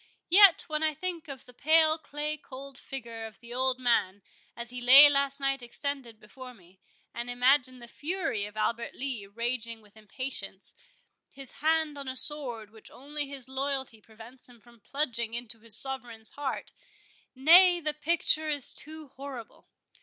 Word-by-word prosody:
Yet, 395 -1 +7
when 305 -1 -2
I 310 -1 0
think 345 -1 -5
of 270 -2 -9
the 250 - -16
pale 315 +3 +3
clay 300 0 -4
cold 275 -2 -12
figure 235 -4 -8
of 215 -3 -16
the 235 0 -11
old 260 0 0
man, 205 -6 0 0.3
as 235 0 -6
he 250 0 -7
lay 265 +4 +10
last 280 0 0
night 275 -1 -1
extended 245 -2 -4
before 250 +4 -12
me, 185 -2 -23 0.3
and 240 +1 -6
imagine 255 +1 +2
the 240 -1 -12
fury 300 - -3
of 210 +1 -14
Albert 235 +2 -2
Lee 250 -7 -4
raging 230 +1 -4
with 210 -1 -22
impatience, 215 -3 -6 0.6
his 270 -2 -2
hand 315 -1 +1
on 275 - -7
a 260 - -4
sword 250 -7 0
which 220 -1 -12
only 290 +2 -5
his 275 -3 -5
loyalty 265 -3 -2
prevents 225 +4 -12
him 240 -1 -18
from 235 +2 -21
plunging 235 -1 -2
into 235 -1 -5
his 225 -1 +2
sovereign's 245 -5 -1
heart—nay, 345 - +1
the 305 -2 -2
picture 310 0 +2
is 290 -3 0
too 310 -1 -7
horrible! 265 -3 -10
260 Hz, 160 wpm, -28 LUFS, 235-290 Hz, 0.6 s, lay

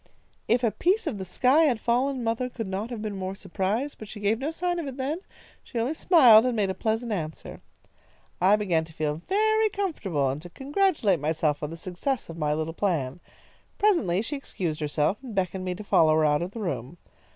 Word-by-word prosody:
"If 240 +2 +2
a 230 - +3
piece 380 - +1
of 255 -11 -3
the 190 - -4
sky 260 - +3
had 250 -7 +2
fallen, 250 +3 0
mother 230 +2 -1
could 230 -2 -5
not 195 +4 -4
have 230 -3 -5
been 210 -2 -3
more 190 0 -4
surprised, 210 +10 -2
but 215 - -8
she 210 - -9
gave 210 +2 +1
no 280 +3 -2
sign 350 +2 -2
of 320 - -4
it 265 -1 -6
then. 280 +5 -2 0.4
She 245 - -8
only 235 +6 0
smiled 260 - +7
and 250 -1 0
made 200 -3 +1
a - - -3
pleasant 225 +4 -2
answer. 160 -6 -5 0.8
"I 190 +3 +6
began 185 -6 +1
to 160 - -16
feel 155 0 -2
very 435 +2 +3
comfortable, 220 - -1
and 140 +3 -5
to 175 - -10
congratulate 275 - +1
myself 150 0 0
on 150 - -3
the 165 - -7
success 185 +9 -3
of 165 - -8
my 150 -1 0
little 160 +1 -3
plan. 165 -7 -1 0.6
Presently 225 - +2
she 290 - -4
excused 175 - -4
herself, 150 +5 0
and 245 -5 -8
beckoned 190 0 -1
me 180 -1 -2
to 210 - -8
follow 160 -5 +4
her 155 0 +3
out 150 +1 +2
of 175 - -2
the 225 +3 -7
room. 170 - -4
210 Hz, 215 wpm, -26 LUFS, 170-265 Hz, 0.8 s, smiled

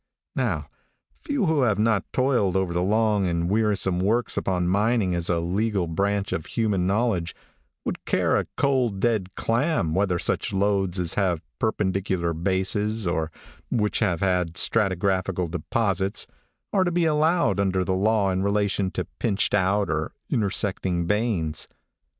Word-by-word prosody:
How, - - -1 0.6
few 285 -8 -1
who 160 -4 +2
have 105 -6 +2
not 110 -2 +1
toiled 120 -8 +2
over 95 -2 0
the 90 - 0
long 105 0 +2
and 85 -1 0
wearisome 105 -4 +1
works 110 +6 +1
upon 90 -2 0
mining 100 0 +2
as 85 -1 -1
a 85 -1 +2
legal 95 +3 0
branch 100 +4 -1
of 80 - -3
human 100 -6 0
knowledge, 100 -5 0 0.5
would - - -4
care - - +2
a - - 0
cold, 130 -8 +1
dead 105 -5 0
clam, 115 - 0
whether 95 -1 +1
such - - 0
lodes 95 -2 +1
as 90 -1 0
have 90 -5 0 0.2
perpendicular 95 -5 0
bases, 95 +5 -1
or 80 -2 -1 0.4
those 120 - 0
which 105 - 0
have 85 -2 0 0.3
stratigraphical 95 -3 +1
deposits, 95 +2 0 0.5
are 195 -2 +4
to 175 - 0
be 170 0 +1
allowed 160 - +2
under 95 -2 +1
the 95 - 0
law 100 +1 +2
in 95 0 -1
relation 100 -1 +1
to - - -3
pinched 100 -4 0
out 100 +1 +2
or 75 0 -2 0.2
intersecting 95 -4 0
veins. 95 -6 -1
100 Hz, 150 wpm, -25 LUFS, 90-110 Hz, 0.6 s, are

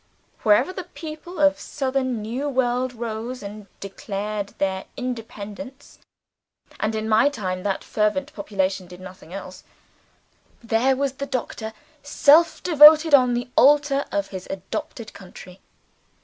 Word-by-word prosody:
Wherever 230 - +3
the 370 -2 -6
people 320 +2 -9
of 290 -1 +4
the - - -14
Southern 260 -5 -2
New 255 +7 -3
World 255 -1 0
rose 235 +1 -5
and 205 0 -9
declared 200 +1 -5
their 190 -1 -1
independence 250 +2 -7 0.8
and, 215 +1 -1
in 220 0 -3
my 220 +6 +4
time, 185 -9 -4
that 195 0 -2
fervent 270 +8 -1
population 195 -2 -2
did 180 0 -12
nothing 185 -2 -12
else 185 -1 -9 1.0
there 230 +4 +2
was 275 0 -1
the 280 +1 -6
Doctor 235 -4 -4 0.3
self 305 +3 +4
devoted 310 -1 +7
on 250 -3 +6
the 245 +1 -4
altar 285 0 +4
of 200 -1 -2
his 185 -2 -8
adopted 220 +4 -6
country. 185 -1 -13
240 Hz, 135 wpm, -23 LUFS, 200-280 Hz, 1.0 s, devoted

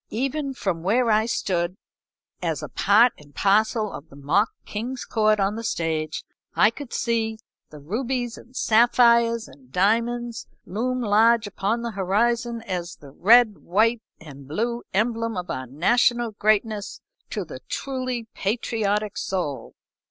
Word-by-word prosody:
Even 275 +4 -2
from 185 -8 -2
where 225 +6 +2
I 215 +1 +3
stood, 180 -5 -1 0.6
as - - -2
a - - -6
part 225 +4 +4
and 145 -1 -18
parcel 215 +1 +2
of 145 - -9
the - - -15
mock 160 +10 +1 0.2
king's 240 +5 -5
court 215 -2 +2
on 195 +1 +1
the 230 - -5
stage, 160 -6 -2 0.3
I 210 - +5
could 275 +1 -9
see 225 -2 -1 0.3
the 150 - -12
rubies 240 - -3
and 250 +2 -16
sapphires 235 0 +4
and 130 -2 -18
diamonds 230 - 0 0.2
loom 250 +6 -2
large 225 +1 +4
upon 205 +3 -2
the 235 - -3
horizon 230 +4 0
as 180 -5 -4
the 140 -2 -14
read, 220 - +5
white, 220 +5 +2 0.2
and 140 -3 -12
blue 235 - -2
emblem 230 +1 0
of 180 0 -4
our 130 0 -4
national 235 - +2
greatness 215 0 0 0.3
to - - -3
the - - -9
truly 255 -3 -3
patriotic 210 -1 -1
soul. 175 -8 -3
220 Hz, 145 wpm, -24 LUFS, 190-235 Hz, 0.6 s, I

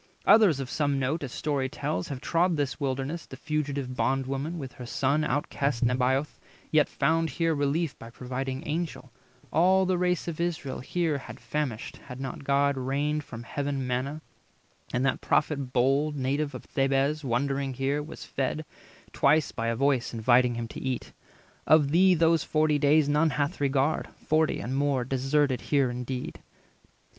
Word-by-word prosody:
Others 200 -11 +6
of 135 - -3
some 145 0 0
note, 135 +5 -1
As 135 -4 -5
story 140 -2 -1
tells, 150 +3 -3
have 140 -4 -5
trod 170 0 +1
this 140 -2 -2
wilderness: 140 +4 -3
The 130 - -10
fugitive 140 -3 -2
Bond 135 +1 +1
woman, 140 +6 -3
with 135 -5 -6
her 125 -3 -9
son, 140 +5 +1
Outcast 140 -2 0
Nebaioth, 130 +4 +1 0.3
yet 155 -1 +4
found 160 +3 +1
here 165 +4 0
relief 145 +2 -1
By 115 - -9
a - - -12
providing 130 +3 -4
Angel; 155 -4 -3 0.4
all 185 +4 +4
the 185 -1 +1
race 180 -1 +1
310 170 - -2
Of 170 +2 0
Israel 145 -5 -6
here 165 +2 -1
had 125 -1 -10
famished, 145 -8 -3
had 125 -2 -10
not 135 +1 -5
God 140 0 +2
Rained 145 +4 -1
from 115 -3 -9
heaven 140 +1 -3
manna; 130 +5 -2 0.7
and 125 +2 0
that 135 - 0
Prophet 140 -4 0
bold, 135 +5 +2
Native 140 +1 -1
of - - -7
Thebez, 135 +2 +1
wandering 135 +1 -1
here, 135 +3 0
was 150 - -9
fed 140 +3 -2 0.5
Twice 150 +1 +3
by 115 - -3
a 115 - 0
voice 130 -2 +1
inviting 120 +2 +3
him 115 0 -3
to - - -7
eat. 130 -2 -3 0.5
Of 150 -3 +5
thee 185 +3 +5
those 165 0 +3
forty 155 -1 +2
days 145 +1 +4
none 150 +2 +3
hath 145 +3 -2
regard, 140 +2 +1
Forty 155 0 +1
and 130 +3 -3
more 140 -3 +1
deserted 135 +1 +1
here 140 -4 +1
indeed." 125 +1 -5
140 Hz, 170 wpm, -27 LUFS, 130-155 Hz, 0.7 s, Others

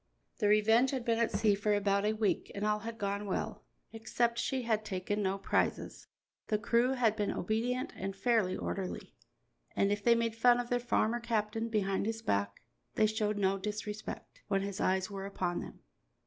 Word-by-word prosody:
The 210 - +2
Revenge 225 +5 +4
had 255 -3 -3
been 230 -1 +1
at 230 - +2
sea 215 -2 +3
for 205 +1 +1
about 200 0 +1
a 215 - +2
week 215 -2 0
and 200 +1 -2
all 210 0 +1
had 225 +1 -6
gone 200 -1 -2
well, 190 - -3 0.3
except 235 +1 0
she 260 +1 -1
had 220 -2 0
taken 205 +1 -2
no 195 0 0
prizes. 195 - -1 0.4
The 215 - +1
crew 235 +4 +2
had 235 -5 +2
been 210 -2 -1
obedient 240 +6 -1
and 195 +1 -4
fairly 215 -3 +1
orderly, 185 - -4 0.6
and 200 - +2
if 205 0 -1
they 235 -1 +5
made 230 -1 0
fun 240 +1 +5
of 245 0 -4
their 245 - +2
farmer 240 -1 +1
captain 225 -1 -1
behind 200 -2 0
his 225 0 -3
back, 100 - -1 0.3
they 215 - +4
showed 215 -1 0
no 195 -1 +1
disrespect 210 +1 -6
when 195 -1 +1
his 200 -1 -4
eyes 190 +1 +1
were 195 -1 -5
upon 180 -3 -2
them. - - -9
215 Hz, 190 wpm, -32 LUFS, 200-230 Hz, 0.6 s, they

